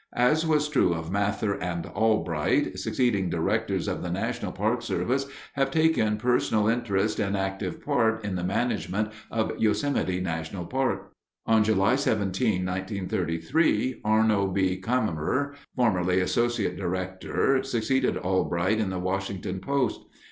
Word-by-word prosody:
As 150 +7 +3
was 150 -1 +2
true 125 - +2
of 80 +1 -5
Mather 100 +1 0
and 85 -1 -3
Albright, 110 -9 +1
succeeding 100 -8 +1
directors 85 -1 0
of - - -2
the - - -4
National - - -2
Park - - 0
Service 135 +3 -1 0.3
have 135 -1 +1
taken 155 -8 +2
personal 110 -2 +2
interest 110 -3 0
and 100 0 0
active 95 -1 -3
part 110 -6 +1
in 100 - -2
the 90 - -3
management 105 0 -1 0.2
of 110 -1 0
Yosemite 105 -3 +1
National 85 0 -4
Park. 100 -7 -1 0.3
On 110 -1 +4
July 105 +2 +3
17, 105 -5 0
1933, 95 - 0
Arno 110 -2 +3
B. 95 -1 0
Cammerer, 125 - 0 0.2
formerly 90 -7 +2
Associate 115 0 0
Director, 95 +8 0
succeeded 130 0 0
Albright 95 +2 0
in 105 -3 0
the 95 - -3
Washington 95 0 -3
post. 135 0 -1
105 Hz, 130 wpm, -26 LUFS, 95-120 Hz, 0.3 s, On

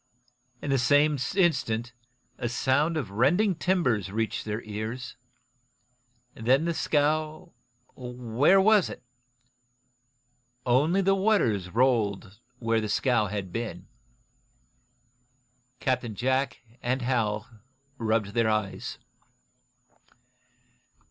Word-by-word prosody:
In 145 - -2
the 135 - +3
same 145 +4 +3 0.2
instant 130 - +1 0.5
a 120 - -2
sound 145 +6 +1
of 115 -11 -4
rending 170 - +3
timbers 125 - 0
reached 110 +1 -2
their 110 +1 -4
ears. 110 +4 -5 1.2
Then 130 +7 +2
the 170 - 0
scow 155 +3 0 0.4
where 125 +7 +2
was 210 -1 +4
it? - - -9 1.6
Only 150 +10 +3
the 195 +1 +4
waters 190 - +1
rolled 105 -4 0 0.2
where 115 -2 0
the 105 - -3
scow 120 -1 +2
had 95 -2 -5
been. 115 0 -4 1.9
Captain 125 -4 -1
Jack 130 +4 0 0.2
and 130 +1 -1
Hal 110 -4 0 0.5
rubbed 110 -3 0
their 115 -1 +2
eyes. 105 -2 -2
125 Hz, 95 wpm, -27 LUFS, 110-150 Hz, 1.9 s, was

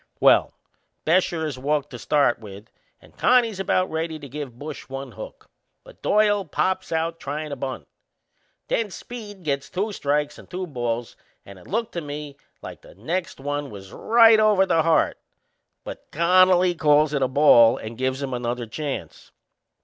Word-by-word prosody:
Well, - - +4 0.5
Bescher 170 -1 +2
is 140 -5 -5
walked 145 +1 -1
to 125 - -8
start 140 -3 +2
with 105 0 -12 0.3
and - - -21
Connie's 235 -5 +3
about 185 -1 0
ready 160 0 -3
to 145 -2 -10
give 140 -3 -7
Bush 150 +1 -8
one 135 +1 -6
hook; - - -11 0.4
but - - -17
Doyle 205 -1 +2
pops 175 +3 -2
out 165 +1 -1
tryin' 150 +2 -5
to - - -3
bunt. 130 0 -6 0.8
Then 225 -2 0
Speed 205 -2 -9
gets 140 -3 -2
two 205 +4 -2
strikes 150 -4 -1
and - - -15
two 185 +1 -4
balls, 120 -6 -4 0.3
and 100 -1 -12
it - - -17
looked 230 +3 -2
to 170 - -4
me 145 -1 -7 0.3
like - - -9
the - - -17
next 170 - -4
one 145 +1 -3
was 95 -3 -11
right 225 -1 +5
over 210 -3 +4
the 165 -3 +2
heart; 160 0 +2 0.6
but - - -9
Connolly 180 +2 +4
calls 150 -2 +3
it 140 - 0
a 130 - +3
ball 125 -4 +6
and 110 +1 -7
gives 130 +3 -2
him 135 -2 -4
another 120 0 -3
chance. 140 +5 -6
150 Hz, 170 wpm, -23 LUFS, 135-185 Hz, 0.8 s, ball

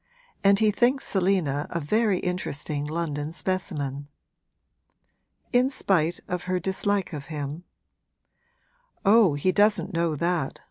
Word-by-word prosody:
'And 200 0 +5
he 215 0 +4
thinks 250 +5 +2
Selina 180 -7 +1
a 170 - -2
very 205 +6 +1
interesting 150 -5 -3
London 150 -1 -3
specimen.' 150 -7 -3 1.5
'In 250 +2 +4
spite 175 - +1
of 180 -1 -3
her 185 0 0
dislike 190 +1 -1
of 145 -2 -6
him?' 150 +2 -5 1.4
'Oh, 200 -6 +5
he 165 +6 +1
doesn't 205 -2 +2
know 165 -2 0
that!' 170 -2 -1
180 Hz, 120 wpm, -26 LUFS, 150-200 Hz, 1.5 s, And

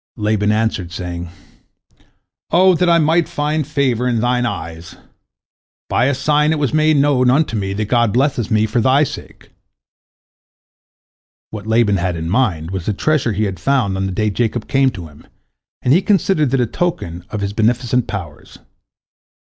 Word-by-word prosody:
" - - -90 0.2
Laban 105 -1 +1
answered, 105 -5 -1
saying, 90 -1 -6 1.2
"O 185 +3 +5
that 180 +1 +1
I 170 - +5
might 165 +1 +2
find 150 0 -2
favor 130 -5 0
in 120 -2 0
thine 125 +1 +1
eyes! 85 -4 -7 0.9
By 125 - +2
a 140 +1 +1
sign 150 +3 +2
it 160 - 0
was 145 -3 -1
made 155 -1 +3
known 140 -3 +3
unto 140 -2 +1
me 95 -2 -2
that 105 +2 -2
God 120 0 +2
blesseth 130 -2 0
me 110 0 +2
for 115 +2 0
thy 130 +5 +3
sake." 145 - -8 2.0
What 105 -1 -8
Laban 110 -3 +2
had 90 -1 -2
in 80 +1 -4
mind 95 -9 0
was 95 -3 -5
the 105 - +1
treasure 135 0 0
he 105 +2 -1
had 95 -3 -3
found 130 -8 0
on 95 0 -2
the - - -4
day 105 +2 -1
Jacob 115 +1 -2
came 135 -1 +2
to 95 -9 -8
him, 75 -1 -18 0.6
and 125 - +3
he 175 - +4
considered 190 -7 +1
that 135 +1 0
a - - +2
token 90 - -3
of 105 - -4
his 100 0 -3
beneficent 120 +2 0
powers. 85 -8 -8
120 Hz, 175 wpm, -18 LUFS, 100-140 Hz, 2.0 s, O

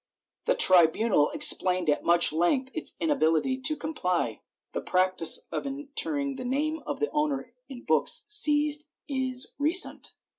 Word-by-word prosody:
The - - 0
tribunal 175 -1 +4
explained 180 -2 +3
at 150 - -1
much 170 -2 +5
length 255 - -1
its 320 - -3
inability 260 - -1
to 305 +4 0
comply. 180 - -4 0.3
The - - -6
practice 185 -2 0
of - - -5
entering 280 0 -5
the 255 - -8
name 300 +5 -4
of - - -6
the 440 - -3
owner 280 -5 -4 0.2
in 250 -3 -12
books - - +3
seized 300 -7 +2 0.2
is 260 -2 -4
recent. 320 +6 0
265 Hz, 140 wpm, -25 LUFS, 185-295 Hz, 0.3 s, much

